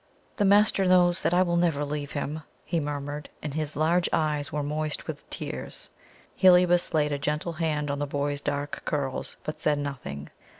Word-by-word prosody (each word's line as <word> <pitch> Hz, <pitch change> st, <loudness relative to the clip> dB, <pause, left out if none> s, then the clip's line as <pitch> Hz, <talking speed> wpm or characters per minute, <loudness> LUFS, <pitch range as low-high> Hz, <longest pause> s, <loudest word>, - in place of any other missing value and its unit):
"The 205 Hz, -, +2 dB
master 200 Hz, -1 st, +5 dB
knows 180 Hz, -1 st, +4 dB
that -, -, +1 dB
I 180 Hz, +1 st, +5 dB
will 170 Hz, -1 st, +1 dB
never 165 Hz, -4 st, +2 dB
leave 145 Hz, 0 st, -4 dB
him," 150 Hz, +2 st, -3 dB, 0.2 s
he 170 Hz, -, 0 dB
murmured, 145 Hz, 0 st, -4 dB
and 150 Hz, -2 st, -3 dB
his 155 Hz, -1 st, -3 dB
large 170 Hz, +3 st, +2 dB
eyes 150 Hz, -2 st, 0 dB
were 150 Hz, 0 st, -1 dB
moist 150 Hz, +1 st, -2 dB
with -, -, -7 dB
tears. -, -, -5 dB, 0.4 s
Heliobas 180 Hz, -2 st, +5 dB
laid 150 Hz, -1 st, +2 dB
a 145 Hz, -, -1 dB
gentle 150 Hz, +3 st, -1 dB
hand 155 Hz, -3 st, -1 dB
on 140 Hz, -, -2 dB
the 145 Hz, -, -1 dB
boy's 145 Hz, 0 st, -2 dB
dark 145 Hz, 0 st, -3 dB
curls, 140 Hz, -3 st, -2 dB
but 155 Hz, -, -5 dB
said 150 Hz, -1 st, +2 dB
nothing. 130 Hz, -, -5 dB
150 Hz, 180 wpm, -27 LUFS, 145-170 Hz, 0.4 s, master